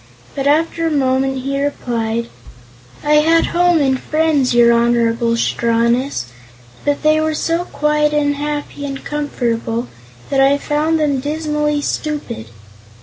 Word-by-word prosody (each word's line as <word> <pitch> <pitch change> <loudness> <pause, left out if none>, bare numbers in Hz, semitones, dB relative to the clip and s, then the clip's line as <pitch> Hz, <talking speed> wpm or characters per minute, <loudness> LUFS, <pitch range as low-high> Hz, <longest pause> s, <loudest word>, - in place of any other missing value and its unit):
But 275 -1 -2
after 330 +2 +1
a - - +1
moment 265 -2 0
he 275 +1 -1
replied: 235 -5 -2 0.8
"I 300 0 +4
had 325 +2 +4
home 350 -1 +3
and 265 -2 +1
friends, 305 -4 +1
your 235 0 +6
Honorable 235 0 +2
Strawness, 235 - 0 0.6
but 290 +1 -1
they 310 0 +3
were 315 0 0
so 335 +3 -1
quiet 300 -1 +1
and 290 -1 +1
happy 290 0 -4
and 275 -1 -6
comfortable 240 -5 -2 0.4
that 275 - +2
I 275 +1 +4
found 305 +3 0
them 290 -3 +1
dismally 300 0 -1
stupid. 290 - -4
285 Hz, 135 wpm, -17 LUFS, 245-300 Hz, 0.8 s, your